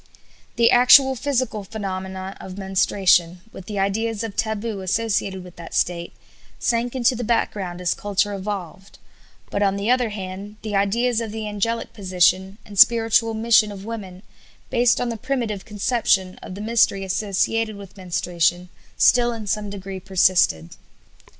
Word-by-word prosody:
The 235 0 +4
actual 265 +2 +7
physical 255 -5 -2
phenomena 190 -2 -6
of 185 0 -9
menstruation, 190 -2 +2
with 190 - -11
the 210 - -5
ideas 215 +3 -1
of 220 -3 -6
taboo 220 -1 -2
associated 195 -1 -1
with 180 -1 -14
that 170 -1 -9
state, 170 -1 -1 0.4
sank 240 +1 -1
into 250 0 +2
the 245 - -4
background 200 -6 -1
as 175 -1 +1
culture 205 0 -1
evolved; 195 -1 -6 0.5
but, 200 - -1
on 195 -1 +2
the 200 +4 0
other 250 -2 +2
hand, 200 0 -7
the 215 -2 -3
ideas 230 +4 +1
of 225 -2 -5
the 220 0 -5
angelic 230 +3 -2
position 190 0 +1
and 200 -2 -6
spiritual 225 -1 +5
mission 220 -1 +3
of 200 -1 -9
women, 195 -5 -7 0.5
based 240 0 +3
on 245 - -1
the 230 - -4
primitive 235 -5 -3
conception 205 -3 0
of 185 - -8
the 200 - -7
mystery 215 -3 +2
associated 210 +3 -1
with 200 -1 -12
menstruation, 175 -1 -1 0.3
still 240 -1 +4
in 225 -2 -6
some 210 0 -2
degree 195 -1 -7
persisted. 180 - +2
205 Hz, 150 wpm, -22 LUFS, 190-225 Hz, 0.5 s, actual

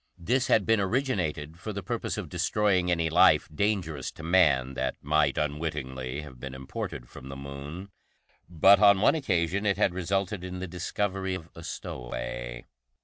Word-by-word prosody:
This 125 +9 +1
had 105 - +3
been 115 -1 +3
originated 95 - -1
for 110 - -5
the 100 0 -5
purpose - - -3
of - - -4
destroying 95 -4 +1
any 85 -2 +2
life - - +5
dangerous 80 -6 -1
to 80 - -11
man 75 -7 +3
that - - -2
might 75 +2 +2
unwittingly 70 -3 -3
have 65 -5 -12
been 65 +1 -7
imported 65 -2 -6
from 65 - -11
the 70 - -6
Moon, 70 +8 -8 0.6
but 95 +4 +6
on 100 -2 +6
one 105 - +5
occasion 95 - 0
it 100 -2 +1
had 90 - +2
resulted 95 +1 -1
in 90 0 -5
the 90 - -4
discovery 95 +2 -2
of 85 -2 -9
a 85 - -11
stowaway. - - -6
85 Hz, 165 wpm, -28 LUFS, 70-95 Hz, 0.6 s, but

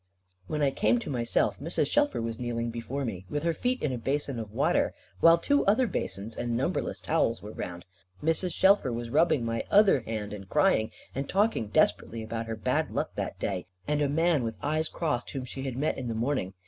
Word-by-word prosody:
When 150 -1 -1
I 140 - +3
came 115 -2 +2
to 120 - -4
myself, 120 -3 0
Mrs. 165 +5 0
Shelfer 290 - +1
was 115 -1 -4
kneeling 120 -1 -2
before 120 +4 -4
me, 95 -5 -5
with 145 0 -2
her 170 0 +2
feet 250 +9 -1
in 150 - +1
a 125 - -3
basin 135 0 -1
of 110 -2 -6
water, - - +1 0.2
while 165 0 +7
two 285 +12 +2
other 225 +6 +4
basins, 110 - -3
and 120 -1 -1
numberless 130 - -1
towels, 115 -2 +1
were 105 - -7
round. 90 -4 -6 0.4
Mrs. 165 +3 +1
Shelfer 190 -6 +4
was 115 0 -4
rubbing 160 -6 +3
my 115 0 -1
other 200 -7 +6
hand, 110 -3 -5
and 100 -2 -8
crying 110 0 +3 0.2
and 135 +1 -3
talking 200 - +2
desperately 110 +2 +1
about 115 +1 -4
her 115 - -3
bad 110 - 0
luck - - -2
that - - -4
day, 95 -3 -3 0.2
and 150 0 +1
a 145 - +2
man 160 -1 +2
with 115 -2 -3
eyes 155 +2 +1
crossed 150 -8 -2
whom 130 -2 -4
she 135 +1 -6
had 130 -2 -3
met 150 +1 0
in 125 - -4
the 115 - -2
morning. 115 -5 -1
125 Hz, 210 wpm, -28 LUFS, 115-155 Hz, 0.4 s, while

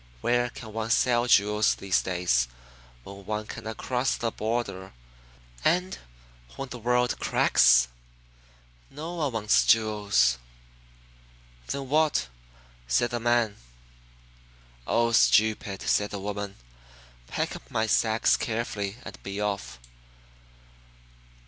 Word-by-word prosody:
Where 120 0 +1
can 110 -2 -10
one 110 0 -3
sell 120 +1 +2
jewels 105 -1 +3
these 95 -1 0
days 90 -10 +1 0.6
when 100 +4 -11
one 105 +1 -3
cannot 110 +1 -7
cross 125 0 -1
the 115 -1 -2
border, 105 -4 -3 0.7
and 180 +3 +1 0.6
when 135 -1 -6
the 125 - -7
world 125 +1 +1
cracks? - - +4 1.0
No 160 +5 -7
one 155 -5 -1
wants 110 -2 +2
jewels!" 100 - +3 1.3
"'Then 140 -1 -4
what?' 150 - +1 0.6
said - - +1
the 120 - -2
man. 120 -2 +1 1.3
"'Oh, 115 0 +2
stupid!' 110 -3 +3
said 105 0 +1
the 100 - -5
woman. 100 0 -5 0.7
'Pick - - -3
up - - -12
my 110 - 0
sacks 110 +1 +2
carefully 110 -3 -3
and - - -10
be 100 +1 -6
off." 100 -13 -3
110 Hz, 110 wpm, -27 LUFS, 100-120 Hz, 1.3 s, cracks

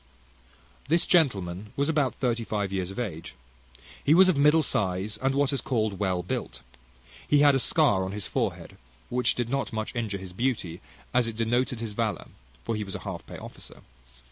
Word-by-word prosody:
This 165 +3 +3
gentleman 105 - +1
was 140 +1 +1
about 150 -5 +1
thirty 120 -3 0
five 100 -3 -2
years 95 -2 -2
of 95 - -9
age. 85 - -5 0.7
He 150 - +5
was 185 +1 +7
of 185 - +3
a - - -1
middle 150 +2 +5
size, 100 -3 -1
and 135 +3 0
what 140 0 +2
is 135 - -1
called 110 -6 -1
well 95 -3 0
built. - - -4 0.6
He 145 -1 +4
had 145 -1 +7
a 135 - +2
scar 125 - +3
on 95 - -3
his 100 -1 -3
forehead, - - -3 0.3
which 125 0 +2
did 120 -2 -1
not 135 +3 -1
so - - -8
much 110 +3 -3
injure 110 -4 -2
his 95 -2 -9
beauty 95 -7 -2 0.3
as 125 -1 +3
it 115 -1 -5
denoted 120 +1 0
his 110 -3 -4
valour 110 -4 -2 0.3
(for 115 - -2
he 105 - -2
was 95 -2 -6
a - - -6
half - - -5
pay - - -8
officer). - - -11
115 Hz, 200 wpm, -27 LUFS, 100-135 Hz, 0.7 s, was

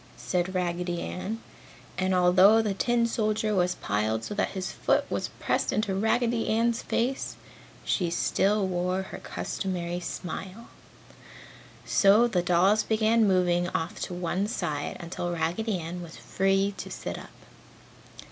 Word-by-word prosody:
said 180 +1 -2
Raggedy 175 -1 -1
Ann. 215 +5 -5 0.5
And 185 0 +1
although 185 +4 +6
the 215 -3 0
tin 235 +3 +1
soldier 215 -1 0
was 180 -2 +2
piled 110 +2 -1
so - - -5
that 210 - 0
his 185 - -3
foot - - +1
was - - -1
pressed - - 0
into 210 -2 0
Raggedy's 230 +2 +1
face, 255 +3 -1 0.5
she 180 -4 +1
still 195 +4 +1
wore 180 +1 -1
her - - -8
customary 175 -2 -3
smile. 190 +4 -6 1.2
So 210 +4 +5
the 190 -7 +1
dolls 180 +5 +3
began 220 0 +3
moving 175 -2 +2
off 165 +2 -2
to 180 - -4
one 180 +3 -1
side 150 -9 -3
until 175 0 -4
Raggedy 175 +6 -1
Ann 175 +1 -6
was 170 -1 -10
free 195 +1 +1
to - - -6
sit - - -5
up. - - -11
190 Hz, 140 wpm, -27 LUFS, 175-215 Hz, 1.2 s, although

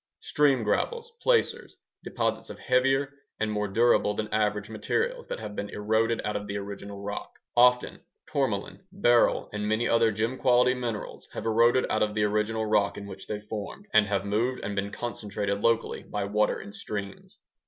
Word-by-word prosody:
Stream 140 -5 +2
gravels 465 - -1
(placers)ŌĆödeposits - - -1
of - - -8
heavier 135 +2 +2 0.3
and 110 -1 0
more 105 -1 -1
durable 105 0 +3
than 110 0 -3
average 105 -1 +1
minerals 470 - -2
that - - -4
have 105 -1 -7
been 100 0 -4
eroded 110 +2 +1
out 105 - -2
of 105 0 -3
the 100 0 -3
original 100 0 -7
rock. 105 +1 -5 0.2
Often 125 +1 +4 0.2
tourmaline, 125 - -2
beryl, 120 -12 +3
and 105 0 -2
many 110 +2 +1
other 115 -1 +4
gem 115 +5 -2
quality 125 -1 +4
minerals 120 -4 -5
have - - -5
eroded 115 +3 +4
out - - +1
of 105 0 +1
the 105 - +2
original 105 +1 0
rock 105 -2 +2
in 100 - -7
which 95 -1 -9
they 105 - -3
formed 105 - -6
and 105 -1 +5
have 100 -1 -1
moved 115 +5 0
and 105 - -3
been 100 +1 -1
concentrated 105 -3 -3
locally 115 0 +1
by 105 -1 -4
water 105 +2 +1
in 100 - -10
streams. 100 -1 -7
110 Hz, 175 wpm, -27 LUFS, 105-120 Hz, 0.3 s, and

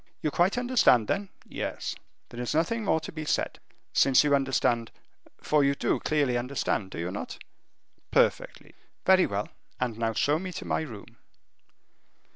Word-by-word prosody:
"You 150 - +1
quite 180 +9 +2
understand, 245 - +4
then?" 200 0 -1 0.2
"Yes." - - -4 0.4
"There 120 - -7
is 125 - -2
nothing 215 +8 +1
more 180 -5 +2
to 155 - -7
be 155 -1 -6
said. 150 - -1 0.3
Since 135 0 +5
you 145 -1 +2
understand, 130 -4 +1 0.5
for 150 -1 +2
you 140 0 +2
do - - 0
clearly 140 -5 +1
understand, 120 -6 -2
do - - -8
you 85 +2 -3
not?" 100 - -6 0.7
"Perfectly." - - +1 0.3
"Very 190 -1 +5
well; 100 +1 -3 0.3
and 120 -3 -2
now 115 -1 0
show 145 +7 +2
me 185 +1 -5
to - - -6
my - - 0
room." 110 -11 -9
140 Hz, 160 wpm, -28 LUFS, 120-160 Hz, 0.7 s, Since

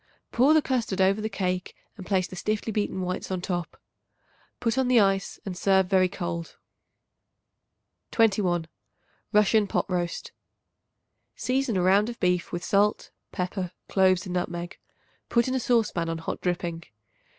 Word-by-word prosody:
Pour 270 +6 +4
the 310 - +4
custard 235 -7 -1
over 195 +2 +3
the 220 - -2
cake 185 -2 -2 0.2
and 190 -4 -10
place 185 -2 +1
the 185 - -9
stiffly 215 +4 -2
beaten 205 -3 -1
whites 180 0 -3
on 185 -1 -2
top. 175 -2 -4 0.8
Put 235 -1 0
on 265 -1 +1
the 250 -2 +5
ice 195 -1 +1
and 190 -3 -4
serve 190 +1 +3
very 185 -1 +4
cold. 170 -2 -5 1.5
21. 195 -7 +2 0.7
Russian 210 0 +4
Pot - - 0
Roast. 175 -2 -3 1.0
Season 255 -4 0
a 180 - +1
round 200 +4 +4
of 235 - -8
beef 180 -2 +1
with 175 0 -4
salt, 205 +1 +1 0.2
pepper, 180 -1 -3
cloves 185 -2 +3
and 180 - -5
nutmeg. 175 -1 -3 0.5
Put 235 0 +2
in 255 - -1
a 260 - +1
saucepan 225 -9 +1
on 165 - -2
hot 165 - -5
dripping. 170 -2 -2
190 Hz, 150 wpm, -26 LUFS, 180-215 Hz, 1.5 s, the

